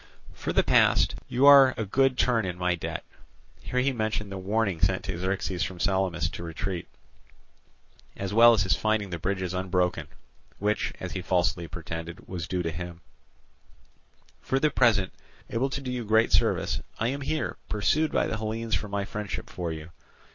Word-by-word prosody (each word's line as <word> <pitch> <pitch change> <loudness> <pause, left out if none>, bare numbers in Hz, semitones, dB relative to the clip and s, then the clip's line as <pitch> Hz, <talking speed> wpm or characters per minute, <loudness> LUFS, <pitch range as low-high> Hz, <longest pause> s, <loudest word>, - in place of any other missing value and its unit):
For - - -4
the - - +3
past, - - +4
you 130 +3 +2
are 140 -2 +8
a 110 - -2
good 135 +5 +2
turn 120 -3 +2
in 90 -2 -4
my 90 0 +1
debt"—here 80 - -6
he 140 +2 +2
mentioned 110 -4 -2
the 95 - -4
warning 100 -3 0
sent 95 +1 +2
to 95 - -4
Xerxes 95 -1 -2
from 90 0 -3
Salamis 95 -5 +1
to 85 - -7
retreat, 85 +2 -4 1.3
as 100 0 -4
well 115 +2 +8
as 105 -3 +2
his 95 - +2
finding 110 -3 0
the 85 - -4
bridges 95 0 -2
unbroken, 90 -1 0 0.5
which, 105 +1 0
as - - -5
he - - -4
falsely 85 -1 0
pretended, 85 +1 -7
was 90 -2 -5
due 90 -1 -1
to 85 - -2
him—"for 90 - -9
the 150 +1 +2
present, 110 -8 +3 0.4
able 130 +4 0
to 140 - -4
do 130 -2 -4
you 125 -1 -3
great 110 +1 +3
service, - - +1 0.2
I 115 - 0
am 140 +2 -3
here, 155 +3 -2
pursued 155 +9 +1
by - - +2
the 115 - -2
Hellenes 110 +1 -3
for 105 - 0
my 100 -1 -2
friendship 105 -1 -5
for 85 -2 -3
you. 80 +1 -8
100 Hz, 175 wpm, -27 LUFS, 90-115 Hz, 1.3 s, are